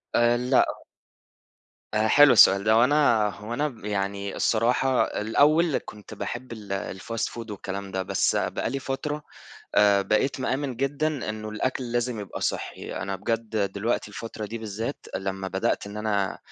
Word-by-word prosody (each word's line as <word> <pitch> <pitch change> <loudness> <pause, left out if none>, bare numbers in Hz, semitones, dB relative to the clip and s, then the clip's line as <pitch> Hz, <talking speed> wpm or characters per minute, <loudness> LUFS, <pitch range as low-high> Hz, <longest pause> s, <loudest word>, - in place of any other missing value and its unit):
آآ، 120 0 +4
لأ. 125 +2 +2 1.1
آآ، 110 +1 +2
حلو 145 +4 +7
السؤال 100 +1 +7
ده، 110 +1 +4
هو 115 +2 +6
أنا 125 -6 +3
هو 105 +4 -7
أنا 145 +1 -1
يعني 100 -1 -2
الصراحة 125 +3 +2
الأول 150 +8 +2
كنت 105 +1 -11
باحب 120 +4 -5
ال 100 -3 -5
الfast 115 +2 -2
food 115 -2 -7
والكلام 100 0 -6
ده، 95 0 -2
بس - - +1
بقى - - -1
لي 135 - -2
فترة 145 +3 -4 0.5
آآ 100 -1 +5
بقيت 110 +8 0
مآمن 130 0 -2
جدًا 145 +1 -1
إنه 110 0 -6
الأكل 120 +3 -2
لازم 120 -2 -1
يبقى 100 - -7
صحّي. - - -3
أنا 95 0 -3
بجد 110 +2 -3 0.2
دلوقتي 105 +3 -1
الفترة 110 +1 -6
دي 115 +3 -6
بالذات، 110 +4 -5
لما 95 0 -3
بدأت 95 +1 -1
إن 100 +1 -8
أنا 100 -3 -1
110 Hz, 155 wpm, -26 LUFS, 100-130 Hz, 1.1 s, حلو